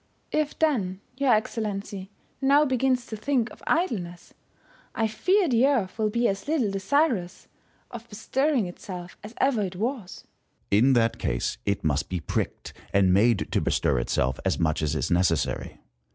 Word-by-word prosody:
If, 305 -1 -1
then, 210 -13 +1 0.2
your 275 -1 +2
Excellency 205 -3 -2 0.3
now 280 +2 +5
begins 255 -2 +1
to 220 - -6
think 240 +1 0
of - - -14
idleness, 190 - -1 0.6
I 225 -2 +1
fear 370 - +2
the 250 -1 +4
Earth 230 -8 0
will 215 -1 +2
be 235 +3 +1
as 195 +5 -3
little 280 -10 +1
desirous 195 - 0 0.4
of 235 0 -9
bestirring 260 +3 0
itself 180 0 -8
as 215 +3 -10
ever 265 -5 +2
it 190 -2 -3
was. 220 -2 -4 0.5
Stcn. 100 - +5
In 130 +4 +5
that 115 -2 +2
case, - - -2
it 100 0 0
must 75 -2 0
be 90 - -2
pricked, 80 - -3 0.2
and 95 -2 +4
made 110 +2 +3
to - - +1
bestir - - +1
itself 65 +2 0
as - - 0
much 80 -2 0
as 75 0 0
is 70 -5 -2
necessary. 85 -2 0
210 Hz, 165 wpm, -26 LUFS, 170-260 Hz, 0.6 s, now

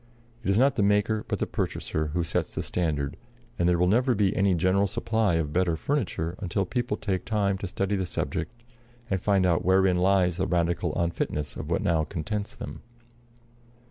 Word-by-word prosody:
It - - -2
is 100 - +3
not 135 +4 +3
the - - +3
maker 105 +2 +2
but - - -1
the - - -1
purchaser 80 0 -2
who 85 +3 -1
sets 80 - -2
the - - -2
standard; 75 -5 -1 0.4
and 90 0 +3
there 90 - +3
will 90 - +3
never 120 +7 +3
be 100 -2 +2
any 100 -1 +3
general 95 +4 +2
supply 110 -1 0
of 75 -3 -1
better 90 -2 +2
furniture 90 - -1
until 100 0 -1
people 120 -4 -2
take 95 -3 -2
time 100 -3 +1
to 100 - -4
study 100 +2 -1
the 95 -2 -1
subject, 120 +6 -4 0.5
and 95 -2 0
find 100 -2 +3
out 85 -1 +2
wherein 95 0 +4
lies 90 -1 +3
the 95 - 0
radical 85 -1 0
unfitness 85 -3 -2
of 75 - -6
what 85 - 0
now 85 -5 +2
contents 100 +5 -4
them. - - -8
95 Hz, 190 wpm, -27 LUFS, 85-100 Hz, 0.5 s, wherein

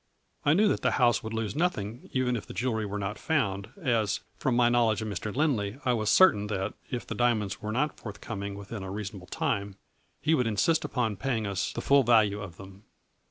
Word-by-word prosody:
I 145 - +4
knew 210 +4 +5
that - - +1
the - - +2
house 120 -3 +4
would 110 - -6
lose 110 -2 -2
nothing 125 - -2
even 130 -1 +1
if 110 - -5
the - - -9
jewelry 110 -4 -1
were 100 +1 -4
not 105 +1 -4
found, 100 -11 0
as, 115 - +1
from 130 - 0
my 120 0 +5
knowledge 115 -3 +2
of - - -4
Mr. 105 +1 -4
Lindley, 120 -6 0
I 125 - +3
was 110 -2 0
cer 185 +8 +8
tain 105 -3 -4
that, 100 0 -2 0.2
if 125 - -4
the - - -4
diamonds 110 -3 0
were 105 -1 -3
not 140 +6 -1
forthcoming 100 -1 -6
within 100 +1 -7
a 95 - -6
reasonable 100 -2 -6
time, 100 -2 -2 0.4
he 155 +3 +2
would 125 -6 +2
insist 155 +10 +2
upon 125 -8 -1
paying 115 -1 -1
us 100 -2 -1
the - - -4
full 140 0 +5
value 110 -4 +3
of 90 -4 -8
them. 95 0 -12
110 Hz, 215 wpm, -28 LUFS, 100-125 Hz, 0.4 s, cer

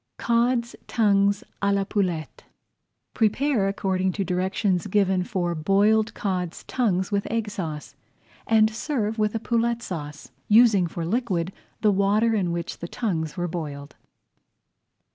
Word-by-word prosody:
CODS' 235 0 +1
TONGUES 200 -3 +2 0.2
À 200 0 +2
LA 200 - +1
POULETTE 180 -6 -2 0.7
Prepare 225 0 +1
according 190 -1 0
to 200 - -1
directions 185 +1 0
given 190 -2 +2
for 175 -2 -2
boiled 205 +6 +2
Cods' 180 -4 -3
Tongues 190 -7 0
with 200 -1 0
Egg 225 -2 -2
Sauce 160 -8 -5 0.5
and 220 -1 +4
serve 225 -3 -2
with 210 +1 +1
a - - 0
Poulette 235 +1 0
Sauce, 150 -6 -7 0.2
using 215 -5 +5
for 165 0 -5
liquid 190 -4 -1 0.3
the 215 - +4
water 205 +4 +2
in 190 -5 0
which 170 0 -4
the 170 - -5
tongues 170 -6 -3
were 175 0 -1
boiled. 150 -4 -6
200 Hz, 135 wpm, -24 LUFS, 180-220 Hz, 0.7 s, using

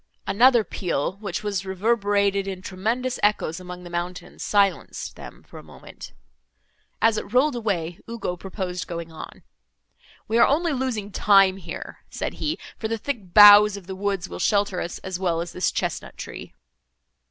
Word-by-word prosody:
Another 240 +2 +5
peal, 180 -2 -3
which 200 -2 -5
was 200 -3 -2
reverberated 200 0 +1
in 185 -1 -6
tremendous 230 +8 -2
echoes 205 -5 +1
among 180 0 -9
the 175 - -9
mountains, 175 +1 -5
silenced 200 -2 0
them - - -12
for - - -12
a - - -13
moment. - - -12 0.9
As 225 -1 +4
it - - -10
rolled 265 +2 +3
away, 180 -8 -2
Ugo 230 -6 -3
proposed 180 -1 -5
going 170 -1 -6
on. 160 - -10 0.8
"We 225 +2 +1
are - - +7
only 320 +3 +1
losing 245 -6 -3
time 195 -2 +4
here," 195 - -8
said - - -4
he, 310 +2 -1 0.2
"for 220 - -2
the 225 +1 -2
thick 215 -7 -5
boughs 205 0 +9
of 195 - -11
the 190 +1 -6
woods 195 -1 -2
will - - -8
shelter 200 -3 +1
us 170 - -5
as 185 -1 -4
well 175 -3 0
as 170 0 -4
this 180 - 0
chesnut - - -4
tree." - - -9
200 Hz, 165 wpm, -24 LUFS, 180-220 Hz, 0.9 s, boughs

